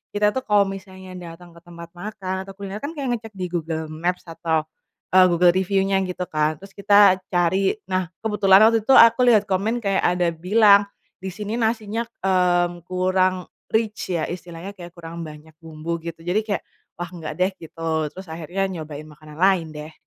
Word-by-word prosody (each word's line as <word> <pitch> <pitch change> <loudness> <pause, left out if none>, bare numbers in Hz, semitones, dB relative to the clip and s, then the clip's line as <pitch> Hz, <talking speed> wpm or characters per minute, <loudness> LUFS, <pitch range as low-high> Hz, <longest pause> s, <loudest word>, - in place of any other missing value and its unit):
kita 210 0 +3
tuh 260 +2 -4
kalau 205 -1 +4
misalnya 190 -1 -9
datang 175 0 -11
ke - - -13
tempat 170 -1 -11
makan 190 -1 -5
atau 195 - -10
kuliner 200 0 -7
kan 285 +9 -6
kayak 265 -6 -2
ngecek 225 -1 -12
di 185 -2 -4
Google 160 -2 -3
Maps 175 +3 -2
atau, 160 -1 -1 0.5
eee, 185 0 +7
Google 175 0 +4
review-nya 195 +1 +1
gitu 180 0 -4
kan 155 0 +1
terus 195 - -11
kita 200 -1 +6 0.2
cari 180 +2 +2 0.2
nah 185 -1 0 0.2
kebetulan 205 -2 +4
waktu 225 -2 0
itu 270 - +4
aku 240 +1 +7
lihat 215 -4 +5
komen 215 +6 0
kayak 195 -1 +1
ada 175 -1 +1
bilang, 200 +4 +4 0.3
disini 205 +4 -5
nasinya, 225 0 -1 0.2
mmm, 175 -2 +1
kurang 185 0 +1 0.3
rich 215 -4 -1
ya 165 -2 0
istilahnya 175 +1 -7
kayak 175 -1 -10
kurang 170 -1 -8
banyak 155 +1 -13
bumbu 165 0 -5
gitu 165 -1 -7
jadi 175 +5 0
kayak, 200 -4 -2 0.3
wah 175 0 -6
nggak 165 -3 -7
deh 185 +2 +3
gitu 160 -1 -3
terus 190 0 -10
akhirnya 175 +4 -3
nyobain 155 -4 -7
makanan 150 0 -14
lain 185 -4 +3
deh. 150 +1 -9
185 Hz, 175 wpm, -22 LUFS, 170-200 Hz, 0.5 s, eee